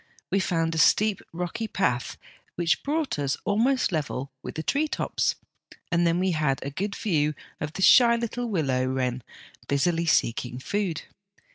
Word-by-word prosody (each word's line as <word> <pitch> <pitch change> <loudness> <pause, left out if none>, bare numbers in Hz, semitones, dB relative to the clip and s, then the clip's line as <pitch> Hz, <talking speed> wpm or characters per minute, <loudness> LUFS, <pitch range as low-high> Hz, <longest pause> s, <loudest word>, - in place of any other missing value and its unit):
We 195 - +3
found 165 -3 0
a 160 - -1
steep, 210 +4 +4
rocky 180 +6 -3
path 125 - -1 0.4
which 170 -2 +1
brought 295 - -1
us 140 -1 0
almost 235 +4 +2
level 140 -4 -3
with - - -7
the 160 - -3
tree 295 - +1
tops, - - -1 0.6
and 170 0 +3
then 165 +1 +2
we 185 +1 +1
had 150 -5 +1
a 140 - -4
good 200 +7 -3
view 155 -7 0 0.2
of 150 +1 -4
the 190 - -2
shy 235 +1 +7
little 235 +1 -3
willow 135 -10 0
wren 130 -1 -1 0.5
busily 165 +4 +1
seeking 125 -4 +1
food. 180 +3 -2
170 Hz, 160 wpm, -26 LUFS, 140-205 Hz, 0.6 s, shy